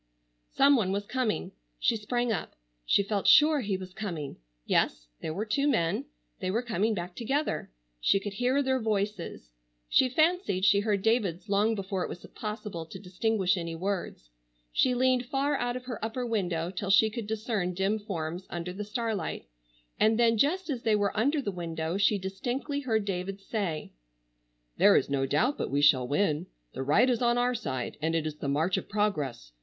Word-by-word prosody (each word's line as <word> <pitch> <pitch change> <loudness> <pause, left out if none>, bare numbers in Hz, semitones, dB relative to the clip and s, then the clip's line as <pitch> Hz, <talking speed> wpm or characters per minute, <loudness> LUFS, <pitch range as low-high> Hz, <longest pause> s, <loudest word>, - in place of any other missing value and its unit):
Some 280 +1 +5
one 200 -7 +1
was 200 +1 -2
coming. 240 - -1 0.3
She 145 - +2
sprang 240 +3 -1
up. 195 - -3 0.3
She 200 - +4
felt 200 -1 -1
sure 305 0 +7
he 200 -4 -1
was 185 -1 -9
coming. 175 -9 -5 0.3
Yes, - - +1 0.2
there - - -3
were 200 +7 -3
two 275 +7 +1
men. 170 - +1 0.3
They - - -2
were 225 +6 0
coming 220 -1 0
back 175 -1 -5
together. 275 +6 -1 0.3
She 195 - +3
could 200 0 -5
hear 250 +6 +1
their 260 -1 +1
voices. 205 - -2 0.4
She 255 - +4
fancied 310 - +2
she 200 +1 +5
heard 205 -2 0
David's 215 -4 +1
long 210 +3 +2
before 195 -1 -3
it - - -2
was 175 - -8
possible 210 -5 -5
to 190 - -9
distinguish 190 +1 0
any 170 -2 -4
words. 180 - -4 0.4
She 250 - +2
leaned 255 0 +2
far 280 +3 0
out 245 -2 -1
of 255 0 -6
her 245 -4 -6
upper 230 +3 -2
window 180 -7 -1
till 195 +1 -4
she 215 +2 +5
could 225 -1 -5
discern 215 -5 -2
dim 195 +4 +1
forms 180 -3 -5
under 175 +1 -4
the 205 +3 -5
starlight, 220 -1 -3 0.5
and 220 +1 +4
then 230 -1 +4
just 325 - +1
as 250 -4 -3
they 220 -2 +2
were 205 -1 0
under 280 +7 +1
the 205 - -2
window 165 -1 -3
she 200 +1 +3
distinctly 245 +10 -3
heard 220 -6 0
David 195 0 -3
say: 195 -6 -3 0.9
"There - - +6
is - - +2
no 135 -1 +1
doubt 230 - +1
but - - -2
we 140 - +1
shall 135 -4 +5
win. 155 +3 0 0.3
The - - -4
right 150 - +4
is 245 -2 +1
on 240 0 +3
our 245 +1 +2
side, 130 - -4
and 165 +1 0
it 160 -1 0
is 155 -1 -4
the 145 - -4
march 155 +6 +1
of - - -5
progress. 150 - -1
205 Hz, 190 wpm, -29 LUFS, 180-240 Hz, 0.9 s, sure